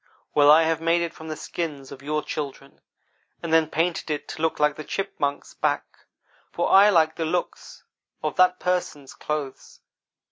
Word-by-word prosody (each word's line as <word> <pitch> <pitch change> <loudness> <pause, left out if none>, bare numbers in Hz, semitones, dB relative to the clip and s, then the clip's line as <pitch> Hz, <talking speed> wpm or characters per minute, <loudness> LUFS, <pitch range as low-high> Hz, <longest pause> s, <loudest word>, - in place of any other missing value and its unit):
"'Well, 145 0 +5
I 155 +2 +8
have 160 0 0
made 170 +1 +2
it 170 - -4
from 160 - -11
the 155 - -4
skins 150 -5 -5
of 135 - -10
your 150 +2 -2
children, 140 -2 -6 0.6
and 165 -1 -2
then 160 -1 +4
painted 165 +1 -1
it 150 -1 -3
to - - -7
look 160 -1 0
like 150 0 +2
the 155 - -7
Chipmunk's 145 -6 -3
back, - - -3 0.4
for 175 - -1
I 200 +2 +8
like 160 -5 +3
the 165 - -1
looks 175 +3 -4 0.4
of 155 - -2
that 180 0 +4
Person's 175 -6 -2
clothes. 150 -3 -5
160 Hz, 175 wpm, -24 LUFS, 150-170 Hz, 0.6 s, I